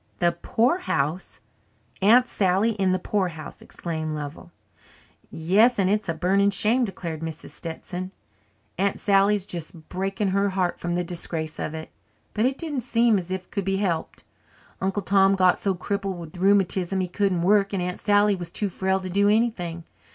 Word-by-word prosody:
"The 175 -1 +3
poorhouse! 190 - -1 0.6
Aunt 235 +6 +6
Sally 200 0 +1
in 195 -4 0
the 185 - +2
poorhouse!" 180 -5 -3
exclaimed 160 -2 -5
Lovell. 150 +4 -7 0.8
"Yes, 200 +10 +3
and 195 -1 +2
it's 210 -3 0
a 165 - -1
burning 195 +4 +2
shame," 220 +5 +2
declared 170 -5 -5
Mrs. 160 0 -7
Stetson. 180 +2 -6 0.7
"Aunt 200 0 +1
Sally's 200 0 +3
just 165 -4 -7
breaking 195 +2 -2
her 200 +1 +1
heart 185 -2 -1
from 175 0 -2
the 180 - 0
disgrace 165 -2 -2
of 155 - -3
it. 160 0 -8 0.4
But 220 +3 +2
it 265 +1 -2
didn't 300 -6 -3
seem 230 -3 +3
as 175 -1 -8
if 185 0 -3
it - - -35
could 200 - -2
be 195 0 0
helped. 175 -5 -2 0.6
Uncle 195 +1 -1
Tom 195 0 +4
got 185 -1 +3
so 195 -2 0
crippled 195 0 -3
with 165 +1 -9
rheumatism 195 -1 +2
he 185 - 0
couldn't 180 -1 0
work 200 +1 +3
and 190 -3 -1
Aunt 180 0 -4
Sally 205 0 +3
was 175 -2 -7
too 200 +3 -2
frail 190 +1 0
to 185 - -5
do 200 +3 +2
anything. 200 -7 0
190 Hz, 175 wpm, -24 LUFS, 175-205 Hz, 0.8 s, Aunt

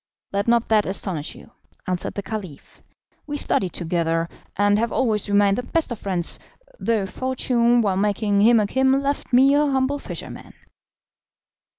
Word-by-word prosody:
"Let 200 +2 -1
not 235 0 +3
that 215 -2 +3
astonish 185 -5 -3
you," - - -15 0.3
answered 180 -1 -3
the 200 - -4
Caliph; 190 -9 -8 0.5
"we 290 0 -3
studied 185 - 0
together, 165 -1 -1 0.3
and 205 +1 +3
have 230 +1 -1
always 220 -5 0
remained 200 +1 +3
the - - -1
best 315 +3 -1
of 235 - -4
friends, 180 -4 -1 0.4
though 220 -4 0
fortune, 245 +1 +1
while 195 -3 0
making 205 0 +1
him 230 +2 +6
a 210 - +2
king, 265 +5 +2
left 280 +1 -1
me 265 +3 +5
a 290 - +4
humble 275 0 0
fisherman." - - -9
210 Hz, 160 wpm, -22 LUFS, 195-255 Hz, 0.5 s, him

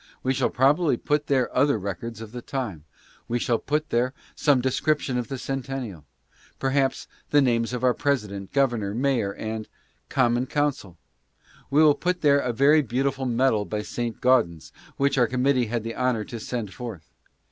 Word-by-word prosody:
We 130 - +1
shall - - +1
probably 140 +2 +3
put 150 +3 -1
there 130 -3 +1
other 140 0 +3
records 105 +3 -5
of 110 -2 -8
the 120 0 -7
time. 110 - -5 0.4
We 120 - 0
shall 120 -1 0
put 150 +2 -2
there 125 +3 +1 0.2
some 145 -3 +3
description 135 +1 0
of 120 -2 -1
the 135 - -4
Centennial; 130 - -5 0.5
per 135 - -1
haps, 135 -1 +1 0.2
the 145 - +5
names 120 -4 +2
of 125 0 -4
our 125 -1 +4
President, 105 -10 -2
Governor, 120 -7 +1
Mayor, 125 -5 +1
and 110 0 -5 0.2
— - - -42
Com 125 -3 +2
mon 125 +2 0
Council! 140 - -1 0.7
We 150 +3 +5
will 150 -2 +7
put 180 +4 -2
there 140 -2 +5
a 125 -3 -1
very 140 +6 +5
beautiful 135 +1 -1
medal 120 -3 +2
by 105 0 -4
Saint 120 +1 -4
Gaudens, 115 - +2 0.3
which 140 -1 +2
our 120 - +4
committee 125 0 +1
had 115 0 -2
the 115 0 -4
honor 125 -4 0
to 120 - -7
send 110 -3 -4
forth. 115 -10 -8
125 Hz, 180 wpm, -25 LUFS, 115-140 Hz, 0.7 s, will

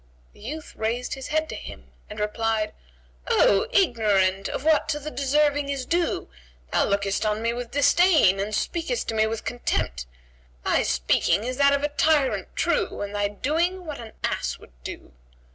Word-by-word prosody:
The - - -20
youth 295 +9 -7
raised 230 +3 -2
his 265 -1 -6
head 315 +1 0
to - - -5
him - - -10 0.2
and 210 - -8
replied, 215 0 -1 0.5
"O 195 - +4
ignorant 205 - +2
of - - -4
what 315 0 +3
to 295 - 0
the 305 +1 -6
deserving 290 +1 +1
is 275 -2 -2
due, 345 +3 0 0.4
thou - - +3
lookest 200 0 0
on 210 0 0
me 230 0 +1
with 240 0 -5
disdain 285 - +4
and 205 +2 -2
speakest 345 +9 -2
to - - -1
me 220 0 +2
with 220 0 -4
contempt; 60 - -2 0.6
thy - - +3
speaking 165 - +1
is 250 +1 -3
that 280 0 +5
of 280 0 0
a - - +3
tyrant 295 -2 +2
true 450 -6 0
and 205 0 -4
thy 205 0 +1
doing 330 - -1
what 300 -4 -6
an 225 -2 -9
ass - - -1
would - - -17
do." - - -8
245 Hz, 180 wpm, -25 LUFS, 210-300 Hz, 0.6 s, that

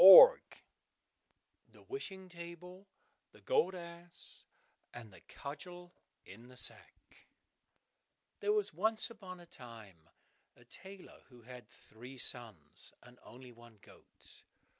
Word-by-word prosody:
36 - - +11 1.1
The - - -17
Wishing 190 - -6
Table, 180 +2 -10 0.5
the - - -18
Gold 455 - +2
Ass, 170 0 -8 0.5
and 115 -4 -10
the - - -15
Cudgel 175 +5 -8 0.3
in 115 +5 -13
the 125 0 -12
Sack - - -1 1.4
There 415 - +1
was 420 -1 +1
once 220 +4 +4
upon 190 -5 -10
a 175 - -13
time 110 - -13 0.5
a - - -19
tailor 190 +1 -12
who 120 -3 -16
had 125 +1 -11
three 125 +4 -13
sons, 110 - -1
and 125 0 -17
only 125 +1 -12
one 120 -1 -16
goat. - - -18
170 Hz, 120 wpm, -35 LUFS, 120-190 Hz, 1.4 s, 36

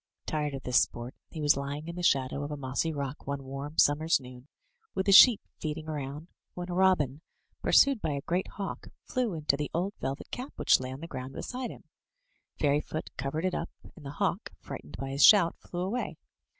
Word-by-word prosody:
Tired 150 -2 -2
of 135 - -7
this 125 - +4
sport, 120 +2 -3 0.2
he 160 - -8
was 145 - +5
lying 140 +3 -4
in 170 - -6
the 180 - -4
shadow 135 -4 +2
of 145 - -4
a 150 - -4
mossy 140 +4 -1
rock 140 -2 -5
one 140 -1 -3
warm 140 +3 -7
summer's 150 +3 +4
noon, 125 0 -12 0.5
with 190 - 0
the 200 - +3
sheep 220 +3 +9 0.2
feeding 155 0 -4
around, 150 +1 -5 0.3
when 180 0 -5
a - - -2
robin, 175 -7 +2 0.4
pursued 275 -5 +5
by 155 - -1
a 140 - -3
great 180 +2 0
hawk, 200 -1 -5 0.2
flew 245 -8 -1
into 150 -3 +1
the 145 +1 -3
old 185 +4 -1
velvet 135 +1 -4
cap 255 +3 -6
which - - +4
lay 130 0 -5
on 135 +2 -8
the 165 - -6
ground 130 -3 -6
beside 250 - -4
him. - - -11 0.7
Fairyfoot 150 +2 -1
covered 140 +6 -2
it 185 - 0
up, 165 - -3 0.3
and 160 - -14
the 140 0 -7
hawk, - - -1
frightened 75 +4 -9
by 135 0 -4
his 140 +1 +2
shout, 195 -6 +7
flew 175 - -6
away. 210 +7 -2
150 Hz, 205 wpm, -29 LUFS, 135-175 Hz, 0.7 s, sheep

